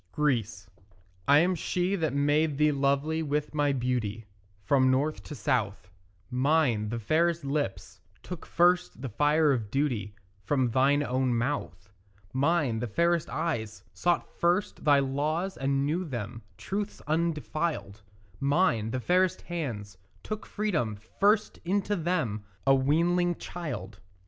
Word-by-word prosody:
GREECE 115 -9 0 0.6
I 145 - +7
am 180 +2 +2
she 180 +2 -1
that 160 -5 0
made 145 +1 +2
thee 150 0 +4
lovely 140 +3 +1
with 150 0 -2
my 145 -1 +2
beauty 120 -5 -2 0.4
From 130 0 +3
north 140 +4 +1
to 150 - -7
south: 110 -9 -1 0.4
Mine, 125 -5 +2
the 115 - -2
fairest 160 +7 +1
lips, 135 -10 -3 0.2
took 180 -3 -7
first 175 -3 +2
the 135 - -3
fire 150 +6 +3
of 115 -6 -1
duty 120 -7 -1 0.3
From 130 +1 +1
thine 140 +4 +3
own 130 -2 0
mouth. 115 -8 -3 0.5
Mine, 140 -4 +1
the 120 - -2
fairest 170 +7 +1
eyes, 120 -10 -3
sought 175 -1 0
first 175 +3 +1
thy 145 -2 +6
laws 150 +7 -1
and 135 0 0
knew 165 +5 0
them 120 - -5 0.2
Truths 205 +1 -4
undefiled; 155 -8 -2 0.4
Mine, 140 - +2
the 130 - -2
fairest 180 +6 +1
hands, 115 - -5 0.2
took 215 0 -5
freedom 165 - -1 0.2
first 210 +2 +3
into 200 +3 0
them, 155 - -1 0.2
A 135 - +6
weanling 170 +6 +2
child. 120 - -6
145 Hz, 135 wpm, -28 LUFS, 120-170 Hz, 0.6 s, I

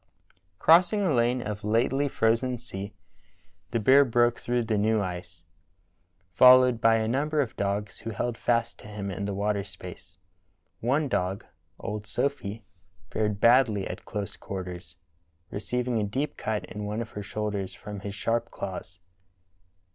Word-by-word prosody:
Crossing 180 - +5
a 175 -6 +2
lane 120 0 +2
of 105 -1 -5
lately 120 +6 +2
frozen 120 0 +1
sea, 100 -4 -7 0.8
the 115 - 0
bear 135 +6 +6
broke 120 -1 +2
through 120 0 0
the 110 -1 0
new 110 +2 +2
ice, 90 -3 -5 0.9
followed 125 -1 +7
by 115 0 +5
a 110 -1 +1
number 150 +6 0
of 130 -6 0
dogs 100 +1 -2
who 115 - -6
held 115 +2 -2
fast 115 0 0
to - - -12
him 105 -2 -5
in 100 +2 -4
the 100 - -2
water 100 0 0
space. 90 -2 -11 0.6
One 140 +6 +1
dog, 95 -4 -1 0.3
old 105 0 -5
Sophy, 115 -4 -2 0.5
fared 105 -2 -1
badl)^ 115 -4 +4
at - - -7
close 105 -3 -5
quarters, 90 -3 -7 0.6
receiving 120 +2 -1
a - - 0
deep 135 +8 -2
cut 110 -1 -2
in 105 - -7
one 105 +3 -2
of 110 - -13
her 105 - -6
shoulders 100 -2 -3
from 105 +2 -8
his 100 +1 -6
sharp 115 +3 -1
claws. 95 -1 -6
110 Hz, 155 wpm, -27 LUFS, 100-120 Hz, 0.9 s, followed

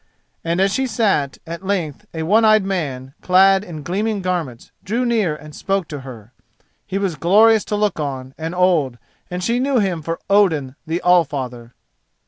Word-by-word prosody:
And 170 +2 -1
as 195 +1 +2
she 265 0 0
sat, 200 - 0
at 170 +3 -7
length 190 -2 -3
a 160 -1 -4
one 210 +8 +3
eyed 215 -2 +5
man, 140 -9 -3
clad 190 +1 +4
in 160 -7 -8
gleaming 200 +4 -2
garments, 165 -10 -3
drew 230 +6 -1
near 215 -10 +1
and 150 0 -12
spoke 195 -3 -1
to 145 - -5
her. 125 -4 -11 0.5
He 195 -1 -2
was 195 -3 -1
glorious 210 +7 +4
to 210 - -2
look 205 -4 0
on, 135 -3 -4
and 160 +2 -5
old, 170 -9 +2 0.3
and 180 0 -4
she 235 +5 +1
knew 270 0 +1
him 190 -7 0
for 165 +2 -4
Odin 160 -10 +2
the 165 +2 -2
Allfather. 135 -9 +1
180 Hz, 175 wpm, -20 LUFS, 150-200 Hz, 0.5 s, eyed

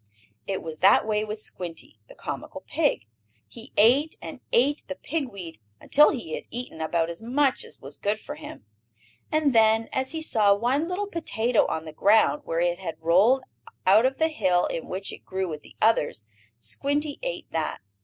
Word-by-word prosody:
It 195 -1 -2
was 160 -1 -7
that 195 +3 +5
way 215 -1 0
with 215 0 -5
Squinty, 170 - -8
the - - -14
comical - - -6
pig. 110 - 0 0.4
He 230 +1 -13
ate 260 +9 +4
and - - -8
ate 285 +5 +3
the 280 - -4
pig 290 -2 -3
weed, 175 - -9 0.2
until 295 +1 +5
he 225 - -4
had - - -5
eaten 240 -9 -6
about 165 +1 0
as 170 - -8
much 265 +4 +1
as - - -3
was 140 +2 -9
good 210 +1 -1
for 290 - -7
him. 300 - -10 0.7
And 305 -3 +2
then, 225 0 +4
as 265 0 -1
he 320 0 -3
saw 210 -8 +4
one 255 +9 0
little 365 +3 -2
potato 250 - +1
on 160 - -3
the 155 - -8
ground, 220 - +4
where 165 - -1
it 175 0 +1
had 175 -4 -6
rolled 195 +11 +4 0.4
out 215 +6 +6
of 265 - -4
the 320 0 +2
hill 185 - +2
in 165 - -4
which 195 +1 -4
it - - -11
grew 190 0 -3
with 155 -3 -6
the - - -17
others, 215 - +2 0.3
Squinty 285 - -2
ate - - -5
that. 160 -1 -2
220 Hz, 190 wpm, -26 LUFS, 175-280 Hz, 0.7 s, out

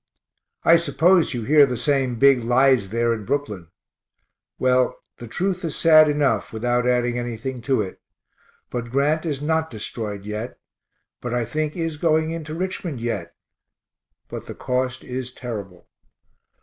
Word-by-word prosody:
I 165 - +7
suppose 165 0 +3
you 120 - -3
hear 145 +3 +6
the 125 -2 -3
same 135 -2 0
big 135 -1 +5
lies 125 -3 +3
there 115 +2 +1
in 110 -2 -5
Brooklyn. 105 - -3 0.9
Well, 130 0 +2 0.2
the 120 - -8
truth 180 - -2
is 165 -3 -3
sad 155 -2 +6
enough, 145 -7 +1
without 120 +2 0
adding 120 -1 +1
anything 120 +1 -5
to 130 -5 +3
it 95 - -9 0.7
but 120 -1 -4
Grant 150 +6 +1
is 145 -2 -3
not 160 +1 0
destroyed 105 -2 -6
yet, 105 +3 -5 0.6
but 120 0 -3
I 120 -1 0
think 155 +6 -3
is 165 -2 -2
going 160 0 +1
into 160 -2 -5
Richmond 180 -5 -4
yet, 120 0 -4 0.9
but - - -8
the - - -7
cost 130 0 -2
is 125 0 -5
terrible. 105 -8 -8
130 Hz, 150 wpm, -23 LUFS, 120-155 Hz, 0.9 s, I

